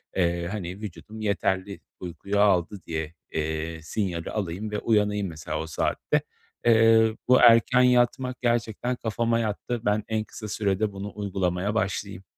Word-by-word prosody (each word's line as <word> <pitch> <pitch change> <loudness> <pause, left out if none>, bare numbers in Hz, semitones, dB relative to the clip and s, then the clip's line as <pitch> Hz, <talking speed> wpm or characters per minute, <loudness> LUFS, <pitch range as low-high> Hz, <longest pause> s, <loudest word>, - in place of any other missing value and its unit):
eee, 85 -1 +1
hani, 95 -1 -5
vücudum 110 +2 -8
yeterli 100 -1 -1 0.2
uykuyu 95 +3 -3
aldı 100 -1 +3
diye, 80 -1 -3 0.2
eee, 80 +1 -3
sinyali 85 -1 -3
alayım 105 +1 -3
ve 105 - -1
uyanayım 105 -2 +1
mesela 80 -3 -5
o 80 - -4
saatte. 80 - 0 0.4
Eee, 115 -1 +5
bu 125 0 +6
erken 120 +2 +6
yatmak 125 +1 +2
gerçekten 120 0 0
kafama 115 0 0
yattı. 115 +1 -2
Ben 105 +1 +2
en 110 -1 -1
kısa 110 0 -9
sürede 105 0 0
bunu 100 +1 -6
uygulamaya 95 0 -1
başlayayım. 100 -2 -2
105 Hz, 140 wpm, -26 LUFS, 90-110 Hz, 0.4 s, bu